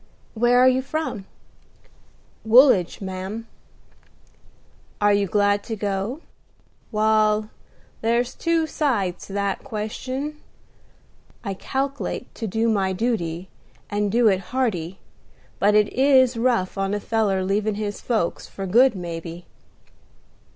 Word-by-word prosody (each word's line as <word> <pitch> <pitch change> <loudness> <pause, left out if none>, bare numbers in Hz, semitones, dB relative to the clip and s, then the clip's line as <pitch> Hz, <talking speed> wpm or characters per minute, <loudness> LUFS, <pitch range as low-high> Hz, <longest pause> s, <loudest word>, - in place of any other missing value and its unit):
"Where 240 +2 +3
are 255 +1 +6
you 260 0 +3
from?" 270 -8 -4 1.2
"Woolidge, 220 -7 +5
ma'am." 190 +4 -5 1.5
"Are 205 0 +4
you 200 -1 +2
glad 205 +1 +2
to 225 - -3
go?" 205 +7 -3 0.7
"Wal, 215 0 +2 0.5
there's 235 +2 +1
two 335 -1 +1
sides 235 - -1
to 195 - -9
that 200 -1 -1
question. 260 +6 -5 1.0
I 200 -3 -3
calk'late 270 +4 -4
to 225 - -5
do 225 +4 0
my 195 -4 +1
duty, 185 -5 -2 0.4
and 205 0 0
do 235 +1 +4
it 190 -3 +3
hearty: 190 -9 -1 0.6
but 205 +1 +3
it 210 -1 +3
is 260 -2 +4
rough 230 -6 0
on 195 +1 0
a - - -2
feller 205 -3 0
leavin' 205 +2 0
his 205 -1 -4
folks, 220 -8 -1
for 195 - -6
good, 235 +6 +4
maybe." 170 -1 -6
215 Hz, 120 wpm, -23 LUFS, 195-245 Hz, 1.5 s, are